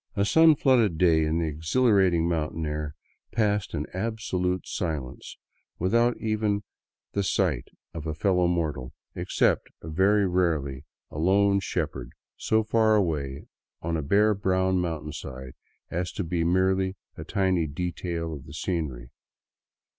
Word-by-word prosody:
A 100 -1 +2
sun 160 +6 +6
flooded 125 - +3
day 80 -2 +4
in 80 +1 0
the 85 - 0
exhilarating 85 - +2
mountain 80 -1 -1
air 75 0 -4 0.4
passed 105 -3 0
in - - -2
absolute 95 -3 -2
silence 75 -8 -4 0.4
without 115 +7 +2
even 110 -2 0 0.5
the 100 - 0
sight 95 - 0 0.3
of 80 -1 -6
a 80 - -3
fellow 90 +1 +2
mortal, 75 -7 -2 0.2
except - - +1
very 95 +6 +2
rarely 80 -6 0 0.3
a 75 - -6
lone 100 +3 +3
shepherd - - -3 0.2
so 110 0 +1
far 110 0 +3
away 75 -8 -1 0.4
on 85 0 -1
a 80 - -1
bare 105 +9 +3
brown 95 -1 +1
mountainside 75 -6 -5 0.4
as 90 +1 -2
to 100 - -3
be 85 0 -1
merely 95 +2 +2 0.2
a - - -7
tiny 95 -4 +1
detail 85 +1 -3
of 70 -1 -9
the 70 - -10
scenery. 75 -9 -3
90 Hz, 135 wpm, -26 LUFS, 80-100 Hz, 0.5 s, sun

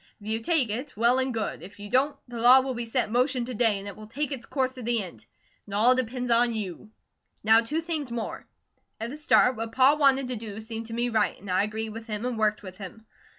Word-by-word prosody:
If 205 - -15
you 220 +1 -1
take 265 -3 +1
it, 250 +3 -5
well 240 +3 +3
and 260 0 0
good; 220 -8 -3
if 190 +4 -12
you 205 - -7
don't, 275 +6 +1
the 240 -1 -7
law 250 +2 +8
will 260 0 -3
be 235 -1 -5
set 245 +2 +1
in 215 - -9
motion 250 0 +1
to 255 - -6
day, 225 -2 +3
and 195 +1 -8
it 200 - -7
will 215 0 -11
take 285 +6 -3
its 265 -3 -5
course 260 -2 0
to 255 - -9
the 235 -2 0
end. 115 - -12 0.4
It 200 - -5
all 230 +5 +5
depends 250 0 -2
on 235 0 +4
YOU. 210 -1 -6 0.5
"Now 220 +2 +6
two 300 +8 -2
things 320 -5 -2
more. 235 -2 -5 0.5
At 230 +2 -4
the - - -6
start, 280 -4 +4
what 225 0 -5
Pa 265 +3 +5
wanted 275 -3 +3
to 250 - -1
do 215 -1 -7
seemed 225 0 -6
to 225 - -7
me 240 +1 0
right, 220 -3 0
and 195 -2 -7
I 180 - +3
agreed 220 +2 -3
with 225 +2 -9
him 215 +1 -4
and 250 -1 -2
worked 215 -1 0
with 185 0 -10
him. 215 +3 -10
230 Hz, 260 wpm, -26 LUFS, 215-255 Hz, 0.5 s, law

